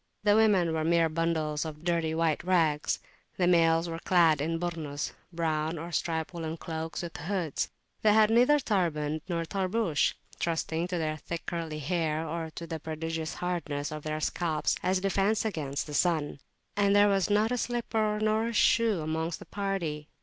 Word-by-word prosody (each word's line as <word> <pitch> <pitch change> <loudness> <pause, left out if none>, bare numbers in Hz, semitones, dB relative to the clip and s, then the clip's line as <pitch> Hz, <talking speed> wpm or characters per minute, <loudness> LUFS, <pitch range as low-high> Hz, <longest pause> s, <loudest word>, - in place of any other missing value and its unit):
The 205 -1 +5
women 200 -7 +4
were 160 -1 0
mere 165 0 +3
bundles 155 -2 0
of 155 -1 -7
dirty 165 -2 0
white 160 -2 +1
rags. 165 -5 +2 0.4
The 180 - +2
males 165 -1 +4
were 165 0 -4
clad 165 -5 +4
in 165 +2 -1
"Burnus" 160 -4 -3 0.2
brown 160 -1 -1
or 165 +2 -6
striped 160 +2 -1
woollen 165 -1 -4
cloaks 160 +2 -5
with 170 - -6
hoods; 170 -2 -2 0.3
they 215 - +5
had 215 0 +5
neither 250 +6 +5
turband 160 - 0
nor 170 -1 -1
tarbush, 190 -2 0 0.2
trusting 165 0 -1
to 180 -1 -2
their 155 -2 -1
thick 170 +2 -6
curly 165 -3 -3
hair 160 0 -1
or 165 0 -3
to 170 - -5
the 160 -1 -5
prodigious 160 +1 -4
hardness 160 -5 -3
of 155 0 -5
their 155 +1 -3
scalps 155 -1 0
as 185 +1 +2
a - - -4
defence 195 +3 +1
against 150 -9 -2
the 150 - -8
sun; 155 -3 +1 0.4
and 200 -1 +3
there 205 0 +6
was 195 -3 +2
not 210 +3 +3
a - - +2
slipper 220 -3 0
nor 215 +1 +1
a 235 - -3
shoe 225 -4 +3
amongst 160 +2 -2
the - - -12
party. 180 -7 -3
165 Hz, 180 wpm, -29 LUFS, 155-190 Hz, 0.4 s, there